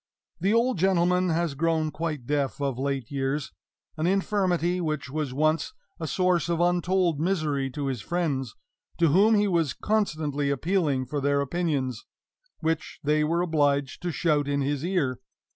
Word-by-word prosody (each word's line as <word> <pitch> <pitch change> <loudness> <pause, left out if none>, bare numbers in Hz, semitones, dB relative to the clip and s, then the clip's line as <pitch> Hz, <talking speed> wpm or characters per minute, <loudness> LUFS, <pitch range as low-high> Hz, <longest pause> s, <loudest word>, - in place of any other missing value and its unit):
The 190 +4 +1
old 230 -2 +2
gentleman 180 0 +3
has 165 -2 0
grown 160 +1 0
quite 155 -6 -4
deaf 145 0 -1
of 135 -3 -2
late 135 -3 -2
years 135 +1 -2 0.5
an 155 +2 0
infirmity 185 -2 +1
which 155 -5 -3
was 150 -2 -2
once 155 - +1 0.3
a 160 - -3
source 180 -1 +1
of 170 -1 0
untold 175 -2 +2
misery 155 -6 0
to 140 +2 -4
his 130 -5 -2
friends, 140 - -2 0.4
to 165 -2 +4
whom 205 +8 +5
he 205 0 +3
was 170 -6 +1
constantly 155 -9 0
appealing 145 -2 0
for 145 +3 -3
their 140 +1 +2
opinions, 140 -6 -1 0.6
which 160 -1 -2
they 150 +1 +2
were 165 +3 +1
obliged 145 -5 +1
to 175 - -2
shout 150 -2 +1
in 140 0 0
his 140 +1 -1
ear. 165 -9 0
155 Hz, 160 wpm, -26 LUFS, 140-175 Hz, 0.6 s, whom